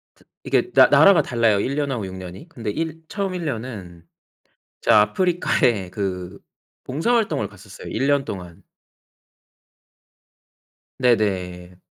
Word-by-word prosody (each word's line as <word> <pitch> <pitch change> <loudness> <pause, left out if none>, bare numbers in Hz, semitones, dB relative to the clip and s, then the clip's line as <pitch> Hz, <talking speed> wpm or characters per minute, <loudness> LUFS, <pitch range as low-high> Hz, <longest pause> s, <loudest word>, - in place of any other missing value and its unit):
트 - - -25 0.2
이게 370 - 0
나 - - +7
나라가 195 -3 +6
달라요, 115 -4 +1
1 135 +7 -2
년하고 135 -7 -2
6 95 - -8
년이. 95 - -10
근데 115 -9 -6
일 160 +2 -4
처음 195 0 -3
1 175 -2 -4
년은 105 - -6 0.8
제가 105 - +5
아프리카에 115 - +1
그 95 -1 -4 0.5
봉사 160 - 0
활동을 155 - 0
갔었어요, 100 -1 -12
1 135 - -1
년 140 -1 +2
동안. 90 -3 -8 2.4
네네. 90 -7 0
110 Hz, 220 characters per minute, -22 LUFS, 95-150 Hz, 2.4 s, 나